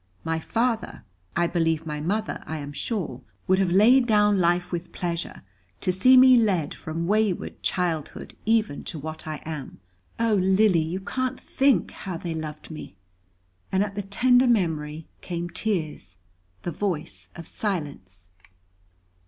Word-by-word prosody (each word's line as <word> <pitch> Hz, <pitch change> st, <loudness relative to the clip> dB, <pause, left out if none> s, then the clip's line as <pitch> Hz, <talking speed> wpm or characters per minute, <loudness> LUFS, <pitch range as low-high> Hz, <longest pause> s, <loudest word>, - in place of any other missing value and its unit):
My 165 Hz, 0 st, -1 dB
father, 230 Hz, +5 st, -1 dB, 0.3 s
I 175 Hz, -, +3 dB
believe, 165 Hz, -2 st, 0 dB
my 150 Hz, -1 st, -4 dB
mother, 205 Hz, +8 st, -2 dB
I 160 Hz, -, -3 dB
am 145 Hz, -1 st, -7 dB
sure, 155 Hz, -, -3 dB, 0.2 s
would 185 Hz, 0 st, +3 dB
have 190 Hz, -2 st, +2 dB
laid 235 Hz, +8 st, +5 dB
down 210 Hz, -2 st, +4 dB
life 175 Hz, 0 st, +1 dB
with 175 Hz, -1 st, -4 dB
pleasure 170 Hz, -, -4 dB, 0.4 s
to 185 Hz, -, 0 dB
see 255 Hz, +8 st, +6 dB
me 255 Hz, 0 st, +8 dB
led 190 Hz, -10 st, +1 dB
from 165 Hz, +1 st, -4 dB
wayward 210 Hz, -1 st, 0 dB
childhood 170 Hz, -5 st, -2 dB
even 220 Hz, -9 st, +1 dB
to 165 Hz, -, -5 dB
what 155 Hz, +2 st, -7 dB
I 155 Hz, -1 st, -5 dB
am. 150 Hz, -9 st, -6 dB, 0.4 s
Oh, 230 Hz, -1 st, +2 dB
Lily, 190 Hz, -2 st, +4 dB
you 170 Hz, +4 st, -3 dB
can't 255 Hz, +5 st, -2 dB
think 270 Hz, -9 st, +2 dB
how 185 Hz, -4 st, -6 dB
they 170 Hz, 0 st, -4 dB
loved 155 Hz, 0 st, -6 dB
me." 155 Hz, -10 st, -9 dB, 0.8 s
And 190 Hz, +1 st, +3 dB
at 200 Hz, -1 st, -4 dB
the 205 Hz, -, -3 dB
tender 245 Hz, +6 st, +3 dB
memory, 160 Hz, -8 st, 0 dB
came 175 Hz, -1 st, -4 dB
tears, 155 Hz, -, -2 dB, 0.5 s
the 175 Hz, -, -2 dB
voice 170 Hz, -2 st, -4 dB
of 170 Hz, -, -8 dB
silence. 140 Hz, -, -5 dB
175 Hz, 150 wpm, -25 LUFS, 160-210 Hz, 0.8 s, me